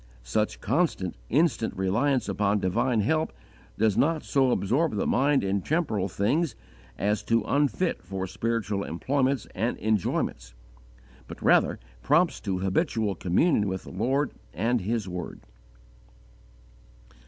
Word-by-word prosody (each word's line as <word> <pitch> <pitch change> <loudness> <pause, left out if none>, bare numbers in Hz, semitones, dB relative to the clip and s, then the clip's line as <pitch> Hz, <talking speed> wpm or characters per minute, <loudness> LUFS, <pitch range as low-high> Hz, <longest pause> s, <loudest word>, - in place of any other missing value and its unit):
Such 105 - -1
constant, 125 - 0 0.2
instant 130 - +1
reliance 120 +8 +1
upon 105 0 +1
divine 105 +5 +1
help 155 +9 +1 0.5
does 110 -2 +2
not 160 +1 +2
so 135 -2 +2
absorb 125 +6 +1
the 100 - 0
mind 140 -1 +2
in 100 0 0
temporal 110 - 0
things 120 - 0 0.4
as 105 +2 0
to 115 -1 +2
unfit 145 - 0
for 95 +1 -4
spiritual 105 0 -2
employments 130 - 0
and 115 +6 -1
enjoyments; 90 - -1 0.7
but - - -9
rather - - +3 0.2
prompts - - +2
to 95 -2 -2
habitual 95 +3 0
communion 105 - +2
with 95 -1 -3
the - - -10
Lord 130 +9 0 0.2
and 115 +5 +1
His 110 +1 -2
Word. 90 -2 -6
110 Hz, 125 wpm, -27 LUFS, 95-135 Hz, 0.7 s, rather